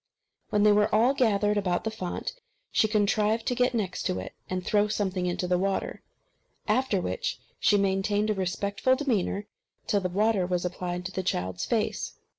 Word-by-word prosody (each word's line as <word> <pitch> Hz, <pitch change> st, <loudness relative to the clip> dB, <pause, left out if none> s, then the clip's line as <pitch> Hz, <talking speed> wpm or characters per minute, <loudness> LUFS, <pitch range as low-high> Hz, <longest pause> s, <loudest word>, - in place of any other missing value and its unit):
When 205 Hz, -1 st, +2 dB
they 210 Hz, -, +6 dB
were 210 Hz, 0 st, +4 dB
all 240 Hz, +5 st, +4 dB
gathered 210 Hz, -5 st, +2 dB
about 180 Hz, -3 st, 0 dB
the 220 Hz, -, -2 dB
font, 185 Hz, -5 st, -4 dB, 0.4 s
she 215 Hz, -, +3 dB
contrived 215 Hz, +1 st, +1 dB
to -, -, +1 dB
get 250 Hz, 0 st, +1 dB
next 195 Hz, -5 st, -2 dB
to 90 Hz, -, -1 dB
it, 95 Hz, -, -6 dB, 0.2 s
and 185 Hz, -1 st, -3 dB
throw 210 Hz, -1 st, +3 dB
something 190 Hz, -3 st, -1 dB
into 180 Hz, +1 st, -1 dB
the 180 Hz, 0 st, +2 dB
water; 195 Hz, +1 st, -1 dB, 0.7 s
after 220 Hz, -2 st, +2 dB
which 95 Hz, -, -3 dB, 0.2 s
she 205 Hz, -, +4 dB
maintained 200 Hz, +2 st, +1 dB
a -, -, +2 dB
very 195 Hz, -, -3 dB
respectful 200 Hz, +7 st, +1 dB
demeanour 215 Hz, -7 st, -1 dB, 0.4 s
till 205 Hz, -, +1 dB
the 185 Hz, -, -1 dB
water 200 Hz, 0 st, +2 dB
was 180 Hz, -1 st, -1 dB
applied 180 Hz, 0 st, -3 dB
to 190 Hz, -, -4 dB
the 190 Hz, -, -2 dB
child's 90 Hz, -, -2 dB
face. -, -, -1 dB
200 Hz, 185 wpm, -27 LUFS, 180-215 Hz, 0.7 s, they